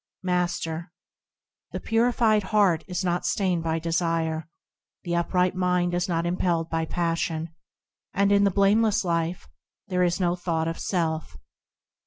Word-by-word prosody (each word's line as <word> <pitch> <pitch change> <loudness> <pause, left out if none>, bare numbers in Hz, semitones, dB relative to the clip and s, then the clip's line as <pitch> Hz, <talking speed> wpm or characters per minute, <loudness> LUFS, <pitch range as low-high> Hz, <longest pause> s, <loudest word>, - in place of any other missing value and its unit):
Master. 175 -2 -1 0.8
The - - -3
purified 225 -1 +2
heart 195 -5 +2
is 180 0 -3
not 175 0 0
stained 185 -5 0
by 165 0 0
desire; 165 -1 -1 0.5
The 170 -1 -2
upright 180 +1 +1
mind 180 -1 +1
is 175 +1 -1
not 170 -1 0
impelled 175 -2 0
by 165 0 0
passion; 165 -1 -2 0.6
And 200 +1 +2
in 200 0 +5
the 200 - +4
blameless 200 +2 +3
life 170 - -1 0.4
there 180 -1 +1
is 175 +1 +1
no 175 -1 +1
thought 165 -2 -1
of 165 - -4
self. 160 -4 -2
175 Hz, 140 wpm, -25 LUFS, 165-185 Hz, 0.8 s, in